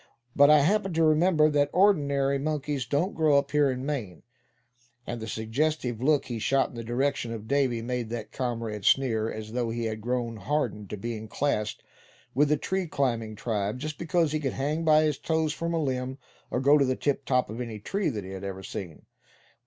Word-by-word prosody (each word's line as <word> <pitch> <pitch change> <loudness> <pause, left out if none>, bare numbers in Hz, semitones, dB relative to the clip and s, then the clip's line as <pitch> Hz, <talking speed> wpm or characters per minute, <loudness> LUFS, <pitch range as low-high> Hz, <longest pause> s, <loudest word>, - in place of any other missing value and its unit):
But 145 0 +7
I 150 -1 +7
happened 195 +3 +1
to 165 - +3
remember 155 0 +4
that 145 -1 +2
ordinary 140 -8 +3
monkeys 145 -3 -2
don't 155 - 0
grow 155 -3 +3
up 140 0 0
here 150 -2 +3
in 130 0 -3
Maine," 115 - -4 0.8
and 120 -1 -5
the 110 - -5
suggestive 120 +2 -1
look 145 +1 +3
he 120 -3 -4
shot 135 +5 +2
in - - -14
the 115 - -5
direction 120 0 -1
of 110 -1 -6
Davy 130 -4 +1
made 120 -1 -3
that 115 -2 -5
comrade 115 -5 -3
sneer; 115 -2 +2
as 110 0 -7
though 120 -1 -1
he 115 +1 -3
had 110 -1 -3
grown 120 -1 -2
hardened 105 -3 -2
to 105 - -5
being 110 +1 -5
classed 110 -4 -1 0.5
with 145 +3 +3
the 150 - +3
tree 190 +3 -2
climbing 115 -7 -1
tribe, 105 0 -2
just 150 +3 -5
because 170 -2 +1
he 155 - 0
could 135 -3 -2
hang 150 +4 -1
by 155 -1 +5
his 150 -3 0
toes 160 -2 0
from 170 +1 -3
a 165 - 0
limb, 130 -2 -2 0.3
or - - -1
go 140 +2 +4
up 150 - +6
to 140 - +4
the 130 0 0
tiptop 130 -5 0
of 115 +3 -5
any 115 -3 -5
tree 195 - -1
that 105 -7 -4
he 95 - -8
had 95 0 -7
ever 95 -1 -5
seen. 90 -4 -7
135 Hz, 210 wpm, -27 LUFS, 115-150 Hz, 0.8 s, But